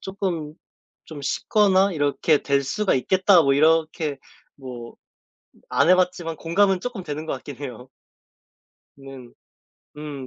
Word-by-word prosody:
쪼끔 180 Hz, -6 st, -4 dB, 0.5 s
좀 150 Hz, -3 st, -10 dB
쉽거나 195 Hz, +5 st, +2 dB
이렇게 145 Hz, 0 st, +1 dB
될 140 Hz, -1 st, +1 dB
수가 210 Hz, +8 st, 0 dB
있겠다 185 Hz, +5 st, +3 dB
뭐 140 Hz, -1 st, +2 dB
이렇게 155 Hz, -1 st, +1 dB, 0.4 s
뭐 125 Hz, -3 st, -9 dB, 0.8 s
안 -, -, +2 dB
해봤지만 180 Hz, -3 st, +1 dB
공감은 190 Hz, +3 st, +1 dB
쪼끔 230 Hz, -2 st, -6 dB
되는 150 Hz, 0 st, -6 dB
것 -, -, -2 dB
같긴 135 Hz, 0 st, -8 dB
해요. 125 Hz, -3 st, -8 dB, 1.1 s
네 135 Hz, -2 st, -12 dB, 0.7 s
음 145 Hz, -3 st, -7 dB
155 Hz, 230 characters per minute, -23 LUFS, 140-185 Hz, 1.1 s, 있겠다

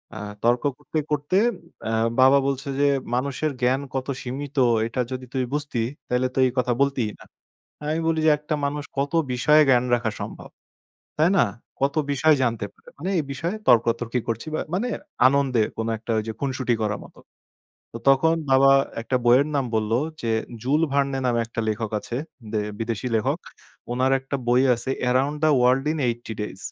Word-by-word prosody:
আ -, -, -6 dB, 0.3 s
তর্ক 120 Hz, +3 st, +3 dB
করতে, 150 Hz, +2 st, -6 dB
করতে 150 Hz, +5 st, +1 dB, 0.5 s
আ -, -, -1 dB, 0.3 s
বাবা 135 Hz, +2 st, +7 dB
বলছে 140 Hz, +1 st, -2 dB
যে, 145 Hz, -, +4 dB, 0.3 s
মানুষের 140 Hz, +4 st, -1 dB
জ্ঞান 130 Hz, +3 st, +2 dB
কত 130 Hz, +1 st, -2 dB
সীমিত, 140 Hz, +3 st, -6 dB, 0.3 s
এটা 125 Hz, +2 st, -2 dB
যদি 130 Hz, 0 st, -5 dB
তুই 130 Hz, -1 st, 0 dB
বুঝতি, 145 Hz, -5 st, -2 dB, 0.3 s
তাইলে 125 Hz, +1 st, +1 dB
তো -, -, 0 dB
এই 125 Hz, -, -2 dB
কথা 125 Hz, -1 st, +2 dB
বলতিই 135 Hz, -6 st, +1 dB
না। -, -, -13 dB, 0.6 s
আমি 155 Hz, +2 st, 0 dB
বলি 160 Hz, -1 st, +1 dB
যে, 155 Hz, -, +6 dB
একটা 150 Hz, +1 st, -2 dB
মানুষ 145 Hz, +1 st, -2 dB
কত 140 Hz, +1 st, 0 dB, 0.2 s
বিষয়ে 150 Hz, +5 st, +5 dB
জ্ঞান 125 Hz, -1 st, +4 dB
রাখা 115 Hz, -2 st, +1 dB
সম্ভব? -, -, -7 dB, 0.7 s
তাই 160 Hz, +3 st, +5 dB
না? -, -, +5 dB, 0.4 s
কত 140 Hz, +1 st, +1 dB, 0.2 s
বিষয় 155 Hz, +3 st, +4 dB
জানতে 115 Hz, -4 st, 0 dB
পারে? -, -, -23 dB
মানে 180 Hz, +6 st, -3 dB
এই -, -, +1 dB
বিষয়ে 170 Hz, +10 st, -3 dB
তর্কতর্কি 120 Hz, 0 st, +3 dB
করছি, 115 Hz, +5 st, -3 dB
বা -, -, 0 dB
মানে 235 Hz, +7 st, 0 dB, 0.4 s
আনন্দে 130 Hz, -4 st, +3 dB
কোন 110 Hz, -, -2 dB
একটা 115 Hz, -, -8 dB
ওইযে 110 Hz, +1 st, -3 dB
খুনসুটি 130 Hz, -3 st, 0 dB
করার 105 Hz, -1 st, -1 dB
মতো। -, -, -19 dB, 0.7 s
তো, -, -, -4 dB
তখন 160 Hz, +5 st, +4 dB, 0.2 s
বাবা 135 Hz, +1 st, +6 dB, 0.3 s
একটা 130 Hz, +3 st, -2 dB
বইয়ের 125 Hz, +4 st, +5 dB
নাম 135 Hz, -2 st, +1 dB
বলল 110 Hz, 0 st, 0 dB, 0.3 s
যে, 115 Hz, -1 st, -1 dB, 0.3 s
"জুল 145 Hz, +6 st, +1 dB
ভার্নে" 140 Hz, -1 st, +1 dB
নামে 120 Hz, -1 st, +2 dB
একটা 115 Hz, 0 st, -4 dB
লেখক 110 Hz, 0 st, -2 dB
আছে। 120 Hz, -, -5 dB, 0.3 s
দে 110 Hz, -, 0 dB, 0.2 s
বিদেশী 115 Hz, +2 st, -2 dB
লেখক। 110 Hz, -, 0 dB, 0.5 s
উনার 130 Hz, +2 st, +1 dB
একটা 135 Hz, +1 st, -4 dB
বই 125 Hz, +1 st, +4 dB
আছে, 120 Hz, +3 st, -6 dB, 0.2 s
"around 135 Hz, +4 st, +1 dB
the 155 Hz, -, +5 dB
world 125 Hz, +2 st, +3 dB
in 160 Hz, -, -4 dB
eighty 120 Hz, -1 st, -5 dB
days." 105 Hz, -2 st, -5 dB
130 Hz, 175 wpm, -24 LUFS, 120-140 Hz, 0.7 s, বাবা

